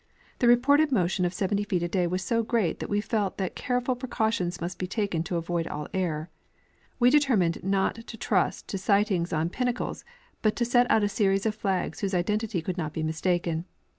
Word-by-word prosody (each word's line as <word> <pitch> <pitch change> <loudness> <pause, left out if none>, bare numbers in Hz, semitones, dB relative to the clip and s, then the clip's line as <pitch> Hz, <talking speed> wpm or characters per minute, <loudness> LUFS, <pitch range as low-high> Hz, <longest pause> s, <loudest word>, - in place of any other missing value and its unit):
The 245 - +3
reported 285 +5 +5
motion 180 -5 +1
of 175 - -1
70 200 +2 0
feet 185 -5 0
a - - 0
day 180 0 +1
was 185 +2 -2
so 230 +5 +1
great 220 -6 0
that - - -5
we 205 0 +1
felt 210 -3 -1
that 190 -2 -3
careful 250 0 -1
pre 250 +1 -7
cautions 220 -7 0
must 170 +2 -5
be 185 - -2
taken 200 -4 -1
to 175 - -3
avoid 170 0 -1
all 150 -1 -5
error. 170 -3 -2 0.7
We 245 0 +5
determined 240 - +2
not 195 +4 0
to 225 - -8
trust 195 -4 0
to 195 - -3
sighting 200 -3 +2
on 160 +2 0
pinnacles, 245 +1 -2 0.4
but 215 -1 +2
to 240 - 0
set 245 +1 +3
out 220 - +4
a - - +3
series 195 -1 +1
of 220 - +1
flags 195 -6 -2
whose 195 -2 -1
identity 205 0 0
could 180 +1 -3
not 155 -2 -3
be 160 - -3
mistaken. 165 +1 -1
195 Hz, 205 wpm, -27 LUFS, 175-225 Hz, 0.7 s, reported